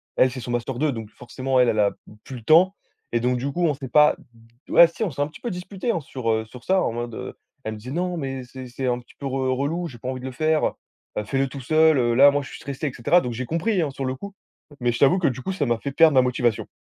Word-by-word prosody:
Elle, 130 - +4
c'est 130 0 -7
son 120 +1 -5
master 120 +2 -2
2, 150 +1 +1
donc 110 -4 -6
forcément, 130 +2 -2
elle, 125 - +5
elle 110 - 0
a 100 -1 +3
p - - -20 0.3
plus 130 - -8
le 115 - -9
temps 180 - +5 0.4
et 120 - +1
donc, 125 0 +1
du 140 +2 -2
coup, 175 +4 0
on 150 - +2
s'est 135 -1 -7
pas 150 0 +5 0.5
ouais! 170 - +8
Si! 170 +7 -5
On 195 - 0
s'est 140 0 -5
un - - -2
petit 155 - -14
peu 240 - -3
disputés 190 +5 -5
hein, 170 - -1
sur, 130 -4 -4
heu, 110 0 0
sur 120 +2 -13
ça 190 0 +3
en - - 0
mode, 120 0 -5
heu, - - -6 0.3
elle 110 - -4
me - - -8
dit: 125 +4 -8
«Non! 175 +3 -2
Mais 135 -3 -4
c'est 130 +1 -10
c'est 125 +2 -5
un 120 0 0
petit 120 - -19
peu 140 - -8
re 130 -1 -1
relou. 165 +5 -1
J'ai 125 - -11
pas 125 +3 -6
envie 130 - -4
de 125 - -9
le 130 - -4
faire. 155 +4 +1 0.4
Bah, 105 - -1
fais-le 135 +5 0
tout 135 +1 -8
seul, 155 +3 +4
heu. 120 -2 +2
Là, 140 +4 +8
moi, 145 0 0
je - - -10
suis - - -9
stressée» 140 +2 -4
et 130 - -4
cetera. 145 +9 +3
Donc, 120 -1 -4
j'ai 130 +2 -4
compris 180 +4 0
hein, 150 - 0
sur 135 0 -5
le 130 - -1
coup! 200 +7 -9 0.4
Mais, 120 0 +1
je 120 - -4
t'avoue 145 +7 +5
que, 180 - +2
du 130 -1 -2
coup, 190 - -3
ça 155 -6 -1
m'a 120 -2 0
fait 140 - -4
perdre 160 +2 +5
ma 130 - +7
motivation. 125 -3 0
135 Hz, 305 wpm, -23 LUFS, 125-155 Hz, 0.5 s, ouais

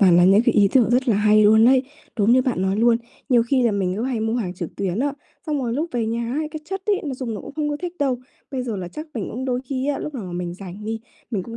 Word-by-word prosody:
toàn 180 -4 +6
là 175 - +6
những 195 +4 +6
cái 240 - +3
ý 200 -1 +5
tưởng 245 -4 +4
rất 250 +1 +2
là 210 - +4
hay 210 0 +5
luôn 220 +1 +6
ấy, 260 0 +5 0.4
đúng 210 +3 +4
như 255 0 +5
bạn 245 -8 -1
nói 190 +1 +1
luôn. 230 +1 +4 0.3
Nhiều 240 -3 +5
khi 255 +2 +1
là 230 -3 +3
mình 190 -2 0
cứ 220 - -2
hay 245 -3 -1
mua 225 +1 0
hàng 190 -7 -2
trực 175 -2 -7
tuyến 195 0 -2
á, 280 +1 +1 0.3
xong 300 -2 0
rồi 235 -1 -1
lúc 305 +6 -1
về 235 -2 0
nhà 230 +1 -2
ấy, 305 0 -1
cái 310 -1 -6
chất 385 +4 -4
ấy 410 -2 +2
nó 280 - -3
dùng 250 -4 -4
nó - - -5
cũng 275 - -9
không 300 -1 -1
có 290 - -1
thích 350 +2 -5
đâu. 270 -3 +1 0.3
Bây 260 -3 -2
giờ 230 -4 -3
là 180 -2 -5
chắc 305 - -7
mình 220 -5 -3
cũng 255 +3 -4
đôi 250 -1 -1
khi 265 +1 -3
á, 290 - 0
lúc 300 - -5
nào 230 -7 -5
mà 180 - -7
mình 175 0 -4
rảnh 195 +2 -9
đi, 225 +1 -3 0.3
mình 200 -5 -1
cũng 230 +4 -8
235 Hz, 315 wpm, -22 LUFS, 205-265 Hz, 0.4 s, toàn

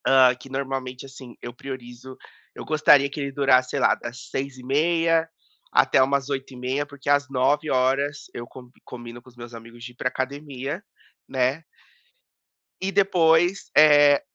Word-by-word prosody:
Ah, 130 -1 +5
que 125 +2 -15
normalmente, 135 -1 -5
assim, 130 -2 -12
eu 120 - -8
priorizo 130 0 -10 0.4
eu - - -9
gostaria 145 -2 +4
que 145 - -8
ele 140 0 -3
durasse 130 -2 +3
sei - - -2
lá, - - +3
das 120 +2 -9
6h30 160 +5 0 0.4
até - - +4
umas 135 +1 +1
8h30 135 0 -3
porque 145 -1 -9
às 145 0 +2
9h 135 +4 0
horas 135 +3 0
eu 120 - -7
combi 125 0 -15
combino 120 -1 -10
com 130 - -18
os 125 - -23
meus 120 0 -10
amigos 115 +1 -12
de 125 - -8
ir - - -31
pra 125 - -2
academia, 140 +5 -5 0.5
né. 130 +4 0 1.2
E 190 +1 -2
depois, 175 -2 +2
eh, 145 -1 +6
135 Hz, 155 wpm, -23 LUFS, 125-145 Hz, 1.2 s, eh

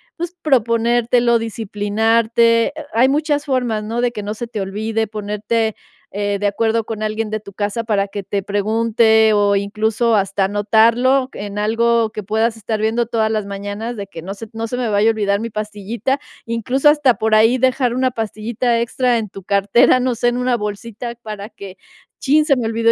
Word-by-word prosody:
pues 345 0 -5
proponértelo, 235 -2 +2
disciplinarte. 225 +2 +1
Eh, - - -4 0.2
hay 245 +4 +4
muchas 295 0 0
formas, 245 -6 -1
¿no?, 225 +3 -3
de 245 0 +1
que 210 -3 -5
no 210 - -3
se 235 +2 -6
te 220 -3 -5
olvide 220 +3 -2
ponerte, 210 +1 -2 0.4
eh, 205 0 -1
de 205 - +1
acuerdo 225 +2 0
con 215 -1 -5
alguien 215 0 -2
de 215 0 -3
tu 200 - -12
casa 205 +3 -3
para 205 -3 0
que 200 0 -6
te 200 +1 -3
pregunte, 220 +2 +3
o 205 -1 +3
incluso 220 +3 0
hasta 195 -1 +1
anotarlo 230 +6 +3
en 205 0 -6
algo 230 +1 +1
que 215 - -6
puedas 220 +3 0
estar 220 0 -3
viendo 225 +2 0
todas 225 -2 0
las 215 -2 -1
mañanas, 205 +4 -5
de 200 - -6
que: 165 -4 -9
"No 190 +4 -6
se 225 +2 -9
no 225 0 -4
se 245 - -4
me 245 -2 -1
vaya 210 +1 +3
a - - +5
olvidar 205 -2 0
mi 230 - -4
pastillita". 215 +5 -3 0.3
Incluso 245 +5 0
hasta 295 -5 +4
por 220 0 +1
ahí 225 +4 +5
dejar 255 -1 +1
una 255 0 +1
pastillita 230 +2 -1
extra 240 +1 +1
en 220 -2 -3
tu 195 0 -11
cartera, 205 +7 +3
no 250 -1 0
sé, 240 +1 +1
en 240 - -2
una 250 0 +1
bolsita 220 +2 -5
para 210 -1 -7
que: 195 -4 -11 0.4
"Chin, 300 +2 +3
se 285 -3 +3
me 240 -3 -2
olvidó 230 0 +2
225 Hz, 195 wpm, -18 LUFS, 210-235 Hz, 0.4 s, a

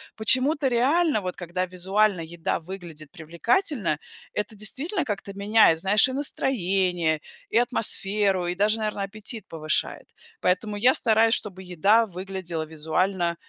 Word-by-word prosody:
почему-то 265 +6 +5
реально, 275 +2 +2
вот 180 -1 -5
когда 180 +1 -3
визуально 190 +1 +1
еда 165 0 -3
выглядит 165 -4 -10
привлекательно,- 170 - -1 0.3
это 210 +1 -4
действительно 275 - -2
как-то 200 -3 -5
меняет, 200 -4 +4
знаешь, 205 +5 +3
и - - -5
настроение, 185 - 0 0.3
и - - +1
атмосферу 205 -6 +1
и 175 - -2
даже, 210 +3 +1
наверно, 210 -2 -3
аппетит 215 +2 -5
повышает. 155 -1 -3 0.3
Поэтому 205 +3 0
я 250 +5 +4
стараюсь, 225 0 +3
чтобы 190 -2 -5
еда 210 +7 +4
выглядела 185 -3 -5
визуально 170 +3 -1
195 Hz, 130 wpm, -25 LUFS, 175-225 Hz, 0.3 s, почему-то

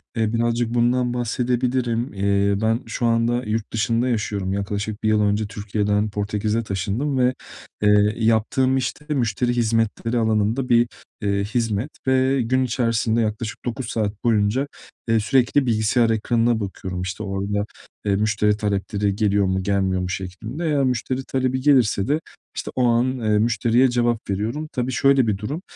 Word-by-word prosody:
Eee, 110 -1 0
birazcık 120 0 0
bundan 120 +1 +2
bahsedebilirim. 120 0 -1
Eee, 100 0 +1
ben 110 +1 +2
şu 115 +1 -3
anda 115 +1 +1
yurt 110 0 -3
dışında 115 +2 +1
yaşıyorum. 105 -5 -1
Yaklaşık 100 +1 -3
1 110 - +2
yıl 110 0 +3
önce 105 +1 +1
Türkiye'den 105 0 -1
Portekiz'e 105 +2 -1
taşındım 110 +8 -2
ve, 125 0 +3 0.5
eee, 105 0 +4
yaptığım 115 +4 +2
iş 125 -2 -1
de 150 0 -4
müşteri 120 -2 0
hizmetleri 115 0 0
alanında 110 +3 +1
bir, 120 0 +4 0.3
eee, 100 -1 0
hizmet 110 +3 -1 0.2
ve 130 0 +3
gün 130 +3 +1
içerisinde 115 -2 +1
yaklaşık 110 0 -3
9 120 +1 -3
saat 105 -2 -2
boyunca, 115 +4 +2 0.4
eee, 115 0 +4
sürekli 130 +5 +2
bilgisayar 115 0 +2
ekranına 115 +1 +1
bakıyorum, 95 -3 -5
işte, 90 +3 -4
orada, 100 +1 -2 0.4
eee, 100 -1 +2
müşteri 105 0 +1
talepleri 100 -1 -1
geliyor 100 -1 +2
mu, 95 0 0
gelmiyor 95 -2 0
mu 90 - -3
şeklinde. 95 - -5
Eğer 145 -3 +2
müşteri 130 +1 -1
talebi 130 0 -1
gelirse 125 -8 +3
de, 150 +2 +1 0.4
işte, - - -5
o 130 - +1
an, 125 +2 +2
eee, 105 -2 +2
müşteriye 120 +3 +3
cevap 120 -2 0
veriyorum. 110 +10 -2
Tabii 125 +1 -2
şöyle 135 -1 +3
bir 105 -2 +1
durum, 135 - -5
115 Hz, 155 wpm, -22 LUFS, 105-125 Hz, 0.5 s, eee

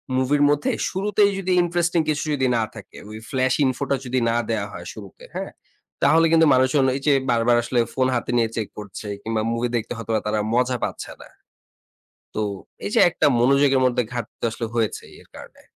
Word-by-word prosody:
মুভির 130 +3 +1
মধ্যেই 145 0 0
শুরুতেই 200 +2 +2
যদি 185 -1 -2
ইন্টারেস্টিং 175 0 0
কিছু 150 -1 0
যদি 130 -2 +1
না 115 - +1
থাকে, 105 -3 -12
ওই 110 - -8
flash 130 -1 +1
info 130 +1 -1
টা 140 - +3
যদি 130 +1 0
না 115 - 0
দেয়া 110 -3 -1
হয় 85 -2 -9
শুরুতে, 100 -4 -12
হ্যাঁ? - - -4 0.5
তাহলে 165 +1 +5
কিন্তু 165 0 +5
মানুষজন 130 +2 +3
এই 135 - -4
যে 145 - +6 0.2
বারবার 120 +1 +3
আসলে 120 +1 0
ফোন 130 -1 +1
হাতে 120 - -2
নিয়ে 115 -1 +2
চেক 110 -3 -2
করছে 105 0 -8
কিংবা 110 +1 -2
মুভি 115 +1 -1
দেখতে 115 0 -2
হয়তো 115 0 -6 0.2
তারা 105 0 0
মজা 125 +1 +1
পাচ্ছে - - -4
না। - - -12 1.1
তো 110 - -1 0.4
এই 100 - -3
যে - - +5
একটা 175 - 0
মনোযোগের 135 +2 +4
মধ্যে 125 -1 +1
ঘাটতি 120 -3 -7
আসলে 115 +1 -4
হয়েছে 115 -3 -1 0.2
এর - - -21
কারণে। - - -13
125 Hz, 190 wpm, -22 LUFS, 115-145 Hz, 1.1 s, যে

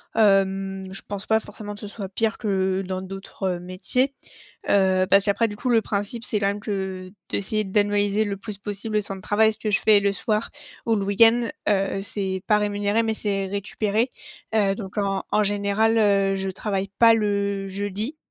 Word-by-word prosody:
Hem, 195 -2 +2
je 195 - -2
pense 200 0 -5
pas 220 0 +3
forcément 205 -1 -8
que - - -11
ce 210 - -6
soit 200 -2 -7
pire 220 +3 -1
que 190 -3 0
dans 185 0 -4
d'autres 190 -1 -4
métiers, 215 +10 0 0.6
heu, 190 -1 +3
parce 200 0 +6
qu'après, 215 +3 +2
du 205 - -7
coup, 255 - -3
le 225 -2 +4
principe, 205 +3 -2
c'est 210 -4 0
quand 195 - +1
même 200 +1 -2
que 190 -2 -4 0.2
d'essayer 215 +2 -1
d'annualiser 205 +1 +1
le 200 -2 -3
plus 205 0 -7
possible 210 +1 -4
le 210 - +2
temps 195 -1 -4
de 190 - -10
travail, 220 +3 +3
ce 215 - -3
que 215 - -2
je 200 - +2
fais 210 -2 +6
le 200 0 +1
soir, 215 +3 -1 0.4
ou 225 - +3
le 200 - -1
week-end, 225 +4 +6 0.3
heu, 195 -1 +1
c'est 190 -2 -3
pas 210 - +4
rémunéré 205 +1 0
mais 225 -1 0
c'est 200 -2 -2
récupéré. 205 +4 -1 0.4
Heu 200 -3 +3
donc 195 -2 -8
en 195 -1 0
en 215 - +4
général, 205 +2 +2
heu, 200 -2 +3
je 190 0 -3
travaille 195 0 -3
pas 230 -1 +7
le 200 -2 -1
jeudi, 205 +7 -3
200 Hz, 195 wpm, -24 LUFS, 195-215 Hz, 0.6 s, pas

